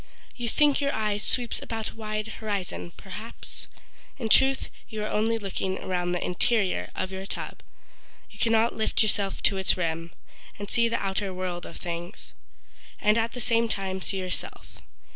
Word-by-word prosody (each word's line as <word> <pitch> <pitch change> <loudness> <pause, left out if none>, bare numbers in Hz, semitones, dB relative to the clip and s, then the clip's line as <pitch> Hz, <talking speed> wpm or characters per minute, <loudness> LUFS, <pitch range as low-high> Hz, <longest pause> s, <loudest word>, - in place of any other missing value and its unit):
You 240 -2 -2
think 295 +2 +4
your 280 0 +2
eye 215 -2 +1
sweeps 235 +3 0
about 225 -1 -3
a - - -17
wide 215 -1 -2
horizon, 200 -5 -2
perhaps, 210 +4 -8 0.5
In 230 -4 -2
truth 265 +4 +5 0.2
you 215 -2 -3
are - - 0
only 225 +2 +2
looking 190 -2 -2
around 175 -1 -1
the 175 - 0
interior 200 +2 +2
of 185 - -1
your 190 0 -5
tub. - - -5 0.7
You 210 - -14
cannot 225 0 +4
lift 220 0 +2
yourself 200 -2 +1
to 195 - +3
its 190 0 +3
rim 165 -1 -1 0.5
And 205 0 -6
see 235 -1 +4
the 235 - +1
outer 195 0 -1
world 180 -1 -3
of - - -9
things, 170 0 -6 0.7
And 210 0 +5
at 230 0 +1
the 245 - -5
same 230 0 +3
time 190 -2 -2
see 195 - -2
yourself. 185 -1 -4
210 Hz, 170 wpm, -28 LUFS, 190-225 Hz, 0.7 s, truth